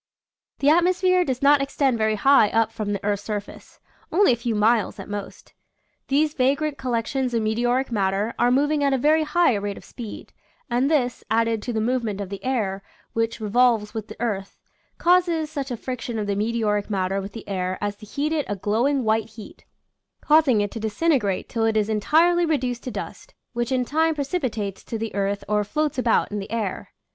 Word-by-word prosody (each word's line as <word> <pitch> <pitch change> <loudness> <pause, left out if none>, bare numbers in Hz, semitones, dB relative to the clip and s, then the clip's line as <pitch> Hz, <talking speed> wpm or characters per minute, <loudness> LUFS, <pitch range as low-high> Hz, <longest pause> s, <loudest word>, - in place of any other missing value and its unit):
The 280 - +3
atmosphere 365 +2 +3
does 260 -4 -3
not 285 0 +6
extend 275 -3 0
very 220 0 +2
high 220 0 +5
up 225 0 +1
from 215 -2 -4
the 200 -1 -3
earth's 205 -1 0
surface. 205 -1 -7 0.3
Only 385 -2 +4
a - - +1
few 235 -1 -2
miles 220 +1 +2
at - - -7
most. 205 -1 -7 0.5
These 295 +2 +2
vagrant 285 +3 0
collections 250 0 -1
of 225 - +1
meteoric 240 +4 0
matter 200 +1 0
are 240 - +4
moving 290 +3 +2
at 280 -1 +2
a - - +2
very 305 +5 +3
high 340 -2 +3
rate 205 -1 -3
of - - -12
speed, 230 -4 -9 0.4
and 250 +4 +2
this, 250 -6 0
added 225 0 +1
to 245 - -4
the 225 - -1
movement 225 -3 -1
of 200 -2 -5
the 200 0 -6
sir, 210 -7 -1 0.3
which 225 0 -1
re 215 - -4
volves 230 -3 +3
with 220 -2 -5
the - - -11
earth, 205 -5 -3 0.4
causes 340 -3 +2
such 280 -3 -4
a 245 - -3
friction 240 -1 -5
of 210 - -2
the 200 -1 -1
meteoric 210 -1 0
matter 195 -1 -1
with 195 +1 -8
the 225 - -9
air 185 -2 -2
as 205 0 -2
to 215 - -13
heat 295 +8 -2
it 300 -3 -1
to - - -2
a - - -4
glowing 235 +8 0
white 220 0 +1
heat, 220 -1 -13 0.5
causing 295 -8 +4
it 205 - -2
to 225 - -6
dis 220 -1 -5
integrate 255 - +1
till 225 - -2
it 220 -1 +1
is 210 0 +1
entirely 325 +11 +3
reduced 255 -7 -1
to - - -5
dust, - - -8 0.2
which 240 +2 -2
in 255 -1 +1
time 320 +4 +1
precipitates 255 - -3
to 225 - -5
the 225 0 -4
earth 200 0 -1
or 210 0 +1
floats 300 +6 -1
about 235 -4 +2
in 205 - -2
the 195 - -7
air. 220 -4 -3
235 Hz, 205 wpm, -23 LUFS, 210-280 Hz, 0.5 s, not